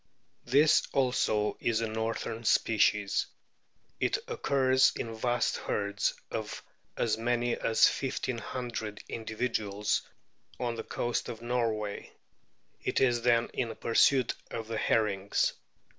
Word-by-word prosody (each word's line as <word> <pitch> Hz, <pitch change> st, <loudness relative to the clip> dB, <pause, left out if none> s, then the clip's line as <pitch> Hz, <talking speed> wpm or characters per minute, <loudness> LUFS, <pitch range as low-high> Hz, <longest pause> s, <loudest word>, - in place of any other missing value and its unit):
This 145 Hz, +5 st, +5 dB
also 125 Hz, -5 st, +1 dB
is 115 Hz, -2 st, +1 dB
a 115 Hz, -, 0 dB
northern 110 Hz, +1 st, -3 dB
species. 105 Hz, -2 st, +2 dB, 0.7 s
It -, -, +1 dB
occurs 130 Hz, -1 st, +3 dB
in 115 Hz, -, -4 dB
vast 120 Hz, +2 st, 0 dB
herds 100 Hz, 0 st, -1 dB, 0.2 s
of -, -, -4 dB, 0.3 s
as 110 Hz, -2 st, 0 dB
many 120 Hz, +1 st, +1 dB
as 110 Hz, -, +4 dB
fifteen 130 Hz, -2 st, -2 dB
hundred 115 Hz, -4 st, -5 dB
individuals 110 Hz, -2 st, -1 dB, 0.6 s
on 120 Hz, -2 st, -1 dB
the 115 Hz, -1 st, -5 dB
coast 120 Hz, +1 st, -2 dB
of 115 Hz, 0 st, -7 dB
Norway; 115 Hz, -4 st, -2 dB, 0.7 s
it -, -, 0 dB
is 120 Hz, -3 st, +3 dB
then 120 Hz, -1 st, +3 dB
in 120 Hz, -3 st, -2 dB
pursuit 125 Hz, +2 st, +3 dB, 0.2 s
of 115 Hz, -1 st, -5 dB
the 115 Hz, 0 st, -3 dB
herrings. 100 Hz, -3 st, +1 dB
115 Hz, 115 wpm, -30 LUFS, 110-120 Hz, 0.7 s, This